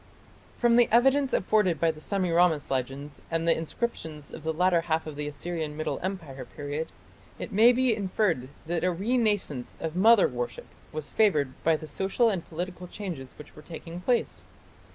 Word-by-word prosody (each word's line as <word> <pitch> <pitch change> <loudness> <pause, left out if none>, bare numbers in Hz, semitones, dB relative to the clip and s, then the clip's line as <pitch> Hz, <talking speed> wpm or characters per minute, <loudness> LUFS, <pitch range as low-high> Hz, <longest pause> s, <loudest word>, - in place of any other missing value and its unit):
From 235 -1 +4
the 240 - +5
evidence 270 +3 +4
afforded 185 -5 +2
by 165 -1 +3
the 155 - -13
Semiramis 175 -4 +1
legends 135 +2 -3
and 165 0 -1
the 165 - +5
inscriptions 160 -4 -4
of - - -7
the 160 - 0
latter 175 +1 +3
half 160 -1 -1
of 155 -2 -7
the 150 0 -4
Assyrian 155 0 -4
Middle 155 - -2
Empire 170 -8 -5
period, 145 +2 -5 0.5
it - - -6
may 225 +4 +7
be 250 -2 +2
inferred 185 - 0 0.2
that 170 0 -1
a 180 - +3
renascence 205 - 0
of 160 0 -4
"mother 220 +3 +6
worship" 120 -1 -4 0.3
was 155 -1 -5
favoured 150 -12 +3
by 165 0 +4
the 155 - -6
social 195 - +1
and 185 -5 -4
political 180 +2 -5
changes 170 -10 -7
which 150 - -13
were 150 - -11
taking 170 +2 -8
place. 240 +4 0
170 Hz, 175 wpm, -28 LUFS, 155-205 Hz, 0.5 s, may